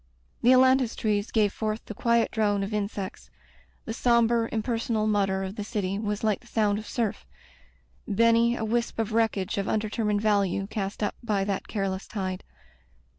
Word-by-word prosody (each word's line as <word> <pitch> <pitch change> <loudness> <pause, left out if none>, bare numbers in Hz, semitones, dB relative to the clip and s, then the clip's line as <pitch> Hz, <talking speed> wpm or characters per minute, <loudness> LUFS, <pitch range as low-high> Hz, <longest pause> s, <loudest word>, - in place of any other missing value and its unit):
The 240 - +4
ailantus 260 -1 +4
trees 210 -1 0
gave 210 -3 +2
forth 215 0 -3
the - - -7
quiet 235 +2 +2
drone 205 -3 +1
of 200 +2 -4
insects; 200 -2 -4 0.6
the 225 - -4
sombre, 235 -1 +2
impersonal 225 -1 -1
mutter 195 -2 +1
of 190 +3 -6
the 210 - -3
city 200 -2 -2
was 210 -1 -3
like 215 -2 +1
the 240 - -20
sound 210 -3 +1
of 215 - -9
surf: 230 -4 -2 0.8
Benny, 230 +3 +3
a 220 - -3
wisp 235 +2 -1
of 225 -1 -2
wreckage 210 -4 +1
of 195 - -2
undetermined 210 -1 0
value 200 -3 +1
cast 200 0 -4
up 205 - 0
by 210 -5 0
that 195 -1 -3
careless 195 -2 -3
tide. 185 -3 -4
215 Hz, 170 wpm, -27 LUFS, 200-230 Hz, 0.8 s, The